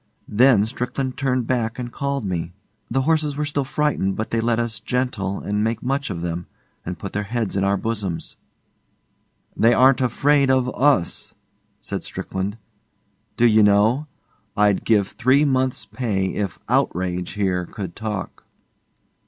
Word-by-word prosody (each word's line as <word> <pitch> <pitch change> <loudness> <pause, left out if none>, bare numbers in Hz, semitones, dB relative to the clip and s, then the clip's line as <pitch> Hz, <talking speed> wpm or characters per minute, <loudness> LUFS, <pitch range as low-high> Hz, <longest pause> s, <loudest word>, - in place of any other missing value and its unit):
Then 115 -2 +5
Strickland 130 +2 -3
turned 130 -3 0
back 115 -2 -1
and 120 -1 -5
called 140 -3 -2
me. 85 -2 -3 0.4
The 135 +3 +1
horses 150 0 +1
were 150 - 0
still 145 -1 -1
frightened, 135 -8 0
but 110 +1 -4
they 115 - +1
let 115 0 +1
us 115 -3 -2
'gentle' 110 -5 -2
and 105 +1 -1
make 115 +1 -1
much 135 +2 -1
of 85 -4 -4
them, 85 0 -3 0.4
and 90 0 -5
put 100 +4 -7
their 105 - 0
heads 115 -1 -2
in 100 - +1
our 100 0 +2
bosoms. 100 -6 -3 1.2
'They 115 +1 +4
aren't 130 +2 +5
afraid 140 +2 +3
of 130 -1 +3
US,' 135 -11 +1 0.5
said - - -4
Strickland. 95 +3 -4 0.8
'D'you 110 -2 +5
know, 105 +8 +4 0.5
I'd 105 -2 +3
give 105 -3 +3
three 130 +4 +3
months' 130 -2 0
pay 100 -7 -2
if 100 -5 -3
OUTRAGE 90 0 0
here 95 -4 -1
could 95 -5 -7
talk. 105 -3 -5
115 Hz, 150 wpm, -22 LUFS, 100-130 Hz, 1.2 s, Then